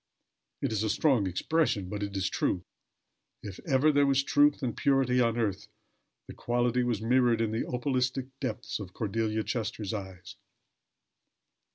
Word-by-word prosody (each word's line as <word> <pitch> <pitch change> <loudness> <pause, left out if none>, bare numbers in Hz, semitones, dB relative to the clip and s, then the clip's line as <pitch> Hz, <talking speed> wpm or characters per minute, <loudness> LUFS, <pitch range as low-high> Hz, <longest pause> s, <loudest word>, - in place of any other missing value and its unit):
It - - 0
is 110 -2 0
a 110 - 0
strong 120 -3 +2
expression, 105 - 0
but 105 +2 -5
it 100 -1 -3
is 95 -1 0
true. 90 -1 -1 0.8
If 100 -3 -8
ever 145 +1 +4
there 145 -1 +3
was 135 0 +3
truth 290 - +3
and 120 -3 -1
purity 135 -2 +2
on 115 -1 +1
earth, 105 -5 -1 0.6
the - - -9
quality 120 +1 0
was 120 -3 -1
mirrored 120 -1 +3
in 115 -1 0
the 110 - -2
opalistic 130 +1 -1
depths 130 -3 -4
of 95 -3 -8
Cordelia 110 0 -1
Chester's 110 -3 -3
eyes. 95 -3 -7
115 Hz, 155 wpm, -29 LUFS, 105-130 Hz, 0.8 s, ever